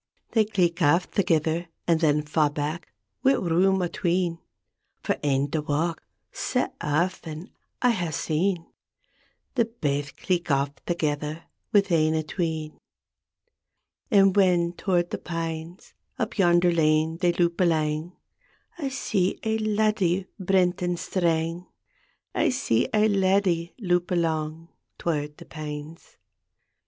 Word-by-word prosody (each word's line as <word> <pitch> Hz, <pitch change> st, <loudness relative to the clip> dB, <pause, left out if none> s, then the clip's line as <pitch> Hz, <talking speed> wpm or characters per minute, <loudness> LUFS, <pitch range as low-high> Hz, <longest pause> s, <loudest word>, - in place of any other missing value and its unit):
They 220 Hz, -2 st, +3 dB
cleek 180 Hz, -4 st, 0 dB
aff 170 Hz, +4 st, +3 dB
thegither, 165 Hz, -2 st, +1 dB, 0.2 s
And 165 Hz, -2 st, +3 dB
then 150 Hz, -2 st, +2 dB
fa' 150 Hz, 0 st, +2 dB
back, 150 Hz, +3 st, -4 dB, 0.4 s
wi' 270 Hz, -, +5 dB
room 185 Hz, +1 st, +2 dB
atween 175 Hz, -1 st, 0 dB, 0.6 s
For -, -, -1 dB
ane 140 Hz, -1 st, +1 dB
to 155 Hz, -, 0 dB
walk; 155 Hz, +3 st, -1 dB, 0.3 s
sae -, -, -1 dB
af 170 Hz, +5 st, 0 dB
ten, 160 Hz, +4 st, -8 dB, 0.3 s
I 250 Hz, -, +5 dB
hae 180 Hz, -7 st, -1 dB
seen 165 Hz, +3 st, -1 dB, 0.9 s
The 235 Hz, -3 st, +2 dB
baith 145 Hz, -10 st, -3 dB
cleek 175 Hz, -2 st, -1 dB
aff 140 Hz, 0 st, +2 dB, 0.2 s
thegither 155 Hz, -2 st, -2 dB, 0.3 s
Wi' 205 Hz, -3 st, +5 dB
ane 160 Hz, -1 st, +3 dB
atween 160 Hz, -1 st, -2 dB
t -, -, -28 dB, 1.3 s
And 195 Hz, -4 st, +5 dB
when 175 Hz, -3 st, +3 dB
toward 175 Hz, -1 st, 0 dB
the -, -, -3 dB
pines 165 Hz, +1 st, -5 dB, 0.2 s
Up 230 Hz, -2 st, -2 dB
yonder 175 Hz, -1 st, +5 dB
lane 160 Hz, 0 st, +2 dB
they 175 Hz, -1 st, +2 dB
loup 170 Hz, -1 st, +1 dB
alang 160 Hz, 0 st, +1 dB, 0.7 s
I 280 Hz, -4 st, -1 dB
see 195 Hz, -8 st, -1 dB
ae 220 Hz, 0 st, 0 dB
laddie 210 Hz, -4 st, +1 dB
brent 185 Hz, -1 st, +2 dB
and 175 Hz, -1 st, 0 dB
Strang, 170 Hz, -1 st, -1 dB, 0.7 s
I -, -, +2 dB
see 125 Hz, -, +1 dB
ae 215 Hz, 0 st, +4 dB
laddie 190 Hz, -4 st, +1 dB
loup 175 Hz, -4 st, +1 dB
alang 165 Hz, -1 st, -1 dB, 0.3 s
Toward 150 Hz, -3 st, -2 dB
the -, -, -12 dB
pines. 150 Hz, +1 st, -8 dB
170 Hz, 125 wpm, -26 LUFS, 155-185 Hz, 1.3 s, wi